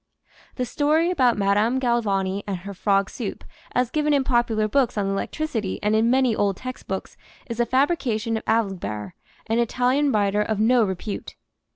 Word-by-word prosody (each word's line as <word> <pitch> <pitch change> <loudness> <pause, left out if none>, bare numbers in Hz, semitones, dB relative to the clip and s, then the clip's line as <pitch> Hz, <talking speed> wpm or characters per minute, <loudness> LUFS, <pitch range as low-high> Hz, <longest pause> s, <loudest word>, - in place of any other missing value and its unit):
The 250 - -1
story 305 +7 +1
about 255 -10 +3
Madame 205 +5 +2
Galvani 200 -6 0
and 195 -2 -2
her 200 - -5
frog 195 0 +1
soup, - - -6 0.3
as 250 -1 +1
given 300 -1 +2
in 275 - +2
popular 235 -4 +1
books 250 0 +1
on 205 - +1
electricity 210 +2 -2
and 210 +1 +2
in 225 +2 +3
many 255 -2 +3
old 200 -2 0
textbooks, 255 -7 -6 0.3
is 235 0 -5
a 240 - +2
fabrication 250 -5 +1
of 220 - -3
Alibert, 175 - -1 0.3
an 225 +1 0
Italian 250 +4 +2
writer 205 -2 +2
of 210 0 -1
no 235 +2 +4
repute. 195 +1 -4
225 Hz, 165 wpm, -23 LUFS, 200-255 Hz, 0.3 s, no